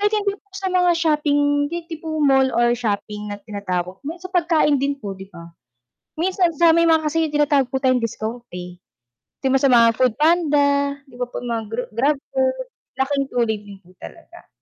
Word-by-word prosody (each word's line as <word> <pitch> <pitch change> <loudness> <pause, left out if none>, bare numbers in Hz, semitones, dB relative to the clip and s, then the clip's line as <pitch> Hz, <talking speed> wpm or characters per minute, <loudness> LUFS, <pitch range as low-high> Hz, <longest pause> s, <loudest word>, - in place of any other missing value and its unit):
kahit 415 +1 +1
hindi 410 -1 0
po 405 - -40
sa 390 -1 -2
mga 360 -1 +3
shopping 290 -2 +1
di 340 +1 -5
tipong 315 -1 -4
mall 270 -1 +4
or 240 0 +3
shopping 210 -2 -3
na 205 - -5
tinatawag, 190 -3 -4
may 320 +3 -4
sa 370 +1 -10
pagkain 325 -5 +2
din 280 0 -1
po, 205 -7 -6
'di 190 0 -11
ba? 170 -3 -12 0.7
Minsan 360 +1 +1
sa 330 +1 +5
may 335 - +4
mga 320 -2 +3
kasi 325 +2 0
yung 300 - -10
tinatawag 285 -3 +2
po 265 - -1
tayong 255 -2 +2
discount, 230 +1 -4
eh, 180 0 -8 0.6
'di 270 - -1
ba, - - +5
sa 275 - +4
mga 230 -1 +6
foodpanda, 295 +4 +3 0.4
'di 255 - -18
ba, - - +1
po - - -6
mga 235 -2 -3
gra 235 +3 -3
Grab 275 +6 +2 0.2
food, - - 0 0.3
laking 275 +1 0
tulong 225 -4 0
din 200 -1 -12
po 180 0 -22
talaga. 345 +1 -13
280 Hz, 195 wpm, -21 LUFS, 230-330 Hz, 0.7 s, mga